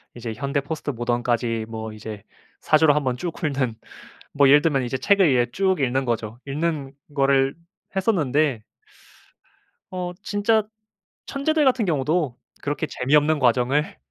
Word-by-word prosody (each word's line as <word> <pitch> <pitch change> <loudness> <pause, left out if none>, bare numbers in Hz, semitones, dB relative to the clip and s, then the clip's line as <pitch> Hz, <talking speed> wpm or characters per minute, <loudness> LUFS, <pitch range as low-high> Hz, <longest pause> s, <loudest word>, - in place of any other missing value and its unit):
이제 120 -2 -5
현대 140 +4 -1
포스트모던까지 120 -5 -2
뭐 110 -1 -5
이제 105 -1 -8 0.4
사조를 155 -1 +4
한번 130 -4 0
쭉 170 +5 -4
훑는. 135 -6 -1 0.6
뭐 140 -1 +4
예를 145 +2 +7
들면 145 -5 +1
이제 125 +2 -3
책을 195 -2 +4
이제 120 -2 +2
쭉 190 -3 +1
읽는 130 0 +1
거죠. 115 -2 -3
읽는 145 -1 -2 0.2
거를 135 -1 +3 0.4
했었는데 150 - +1 1.3
어 180 -1 -4
진짜 210 +2 +2 0.6
천재들 300 +2 +1
같은 255 -4 +3
경우도 150 -3 0 0.3
그렇게 145 +2 -2
재미없는 150 +3 +2
과정을 130 +3 +1
140 Hz, 285 characters per minute, -23 LUFS, 125-160 Hz, 1.3 s, 예를